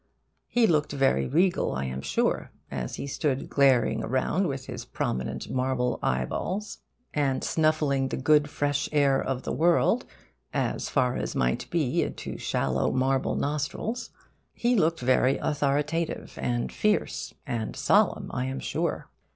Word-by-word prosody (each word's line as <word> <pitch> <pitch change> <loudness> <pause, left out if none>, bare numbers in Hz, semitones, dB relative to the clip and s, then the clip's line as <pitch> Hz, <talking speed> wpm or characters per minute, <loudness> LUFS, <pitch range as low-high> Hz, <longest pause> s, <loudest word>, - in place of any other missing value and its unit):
He 240 -1 +3
looked 155 -7 +2
very 135 - +2
regal, 175 +5 +2
I 65 +1 -2
am 65 +1 -4
sure, - - 0 0.2
as - - -4
he - - -5
stood 135 -1 -2
glaring 135 -3 +3
around 130 - +1
with 135 -3 -4
his - - -6
prominent 65 0 -3
marble 125 -1 0
eyeballs, 185 - -2 0.3
and 140 -3 0
snuffing 155 -4 +2
the - - -3
good 150 +2 +3
fresh 145 0 -1
air 140 -3 +3
of 130 -1 -2
the - - -3
world 175 +9 +3 0.5
as - - -1
far 125 -3 +1
as - - -3
might 60 0 0
be 155 -7 +1
into - - -4
shallow 65 0 0
marble 130 +1 +1
nostrils. 155 - -2 0.5
He 240 +1 +2
looked 165 - +2
very 130 +1 +3
authoritative 150 +3 -1
and 60 -1 -1
fierce 60 - 0
and 115 -2 -3
solemn, - - +2
I 125 - -1
am 135 +1 -3
sure. - - -2
135 Hz, 145 wpm, -27 LUFS, 125-155 Hz, 0.5 s, He